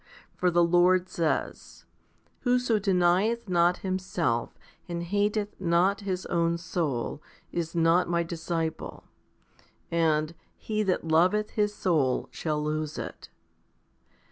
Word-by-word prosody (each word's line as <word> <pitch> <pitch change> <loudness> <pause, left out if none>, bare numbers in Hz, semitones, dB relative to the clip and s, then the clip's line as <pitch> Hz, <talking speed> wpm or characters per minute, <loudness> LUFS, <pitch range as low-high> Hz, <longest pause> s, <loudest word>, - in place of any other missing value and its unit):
For 180 - +2
the 175 0 +3
Lord 180 +2 +3
says, 165 -2 -3 0.5
Whoso 245 -3 +2
denieth 195 +4 +2
not 175 -1 +3
himself, 180 -10 -1 0.3
and 170 0 -3
hateth 205 +3 -1
not 180 +3 +2
his 190 -2 -3
own 170 -1 +1
soul, 155 -6 -3 0.3
is 170 -1 -3
not 170 +1 +3
My 170 0 +1
disciple^ 165 -1 -4 0.9
and, 160 -1 +1 0.2
He 215 -1 -2
that 190 -5 0
loveth 185 +7 +3
his 210 -1 0
soul 150 -11 +1
shall 150 -2 -2
lose 155 0 -2
it. - - -7
175 Hz, 115 wpm, -27 LUFS, 165-190 Hz, 0.9 s, the